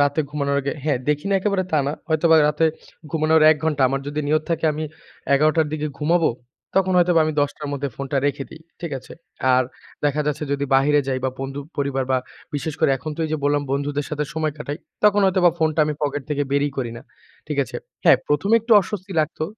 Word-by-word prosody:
রাতে 145 +2 +2
ঘুমানোর 140 -1 -1
আগে 140 0 -2
হ্যাঁ 145 -5 +1
দেখি 150 +2 0
না - - +3
একেবারে 200 -1 +1
তা 155 - +4
না। 140 - 0 0.2
হয়তোবা 160 +1 +4
রাতে 150 +2 +2 0.4
ঘুমানোর 160 +1 +3
১ 155 - +3
ঘন্টা। 150 -3 +1
আমার 135 +1 -1
যদি 145 +1 -2
নিয়ত 155 +1 +2
থাকে 165 -1 -1
আমি 155 +1 -3 0.5
১১ঃ০০ 155 +3 +3
র - - -5
দিকে 150 0 -2
ঘুমাবো 165 +1 +2 0.5
তখন 190 -1 +3
হয়তোবা 175 -1 +4
আমি 155 - -1
১০ঃ০০ 145 +1 -1
র - - -3
মধ্যে 140 0 -2
ফোনটা 140 0 -3
রেখে 140 -1 -1
দেই। 160 - -12 0.2
ঠিক 170 -3 -5
আছে? - - -14 0.4
আর 130 - +4 0.4
দেখা 145 +1 +1
যাচ্ছে 150 0 -1
যদি 140 0 -1
বাহিরে 145 +2 +4
যাই 130 -1 0
বা 130 - +1
বন্ধু, 135 +1 -4 0.2
পরিবার 140 -2 -1
বা 130 - +3 0.4
বিশেষ 145 +1 -3
করে - - +4
এখন 135 +4 -6
তো - - -5
এইযে 155 - -1
বললাম, 145 0 +2
বন্ধুদের 145 +1 -1
সাথে 150 0 -1 0.3
কাটাই। 150 0 -5 0.3
তখন 205 -1 +5
হয়তোবা 185 -2 +4
ফোনটা 160 -1 +1
আমি 150 0 -2
পকেট 145 -1 -1
থেকে 145 -1 0
বেরই 145 +1 +2
করি 125 -4 -2
না। - - -10 0.4
ঠিক 150 -1 -4
আছে? - - -7 0.3
হ্যাঁ, - - +7
১ম 150 +8 +1
এ - - +8
একটু 230 +2 0
অস্বস্তি 190 0 -6
লাগতো। 155 0 -2
150 Hz, 215 wpm, -22 LUFS, 140-160 Hz, 0.5 s, এ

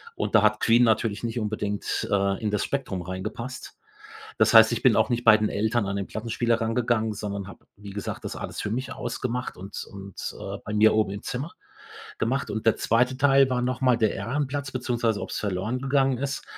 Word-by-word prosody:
und - - -3
da 110 - +6
hat 105 0 +2
Queen 120 +1 +5
natürlich 110 -1 +1
nicht 120 +1 -2
unbedingt, 105 -1 -2
äh, 100 -1 +1
in 110 - 0
das 105 -1 0
Spektrum 100 -10 -3
reingepasst. 110 +8 -6 0.6
Das - - +4
heißt, - - +8
ich - - -1
bin - - +5
auch - - +3
nicht 120 0 -1
bei 110 -2 +8
den 105 0 0
Eltern 110 +2 0
an 100 0 -2
den 100 -1 -3
Plattenspieler 115 +1 -1
rangegangen, 115 -1 0
sondern 100 -2 -5
habe, 100 - -13
wie 100 0 -11
gesagt, 100 +1 -5
das - - -5
alles - - -5
für 105 - -3
mich 130 +4 -3
ausgemacht 125 +1 -4
und 95 +2 -7
und, 100 -1 -7
äh, - - -5
bei 105 - -4
mir 110 +1 +5
oben 110 -3 +2
im 100 +1 -6
Zimmer 135 +7 -4 0.7
gemacht. 130 +5 -1
Und 110 +1 -3
der 115 - +4
2. 125 +3 +1
Teil 135 -1 +4
war 125 -1 0
noch 125 0 -2
mal 130 -2 +4
der 110 -2 +2
Ehrenplatz, 140 +2 -3
beziehungsweise, 120 -4 -1
ob's - - -4
verloren 100 +4 -2
gegangen 135 -1 +1
ist 135 0 -3
115 Hz, 205 wpm, -25 LUFS, 105-125 Hz, 0.7 s, heißt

